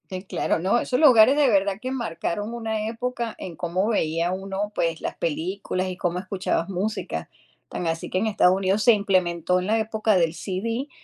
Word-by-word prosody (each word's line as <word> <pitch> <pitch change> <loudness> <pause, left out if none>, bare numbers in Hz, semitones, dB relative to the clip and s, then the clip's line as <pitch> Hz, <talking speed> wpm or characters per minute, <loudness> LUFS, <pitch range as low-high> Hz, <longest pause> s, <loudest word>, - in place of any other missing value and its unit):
Sí, 185 0 -5
claro, 190 - -1
no, 190 +7 +2
esos 250 +1 0
lugares 260 -3 +7
de 295 -2 +5
verdad 200 -3 +2
que 255 - -3
marcaron 210 -3 -3
una 220 -2 -3
época 235 0 -3
en 175 -3 -7
cómo 180 +3 -1
veía 170 -4 0
uno, 195 +2 -4
pues, 165 -1 0
las - - -4
películas 185 +3 -2
y 185 - -4
cómo 175 0 -2
escuchabas 185 -3 -2
música, 195 +3 -3 0.4
tan 175 - -4
así 165 0 -2
que - - -1
en 215 +4 +1
Estados 200 -4 +4
Unidos 195 +2 +1
se 240 - +7
implementó 185 -4 +1
en 185 - -4
la 220 +1 +2
época 220 -1 +1
del 165 -2 +2
CD 225 - -3
195 Hz, 190 wpm, -24 LUFS, 180-220 Hz, 0.4 s, lugares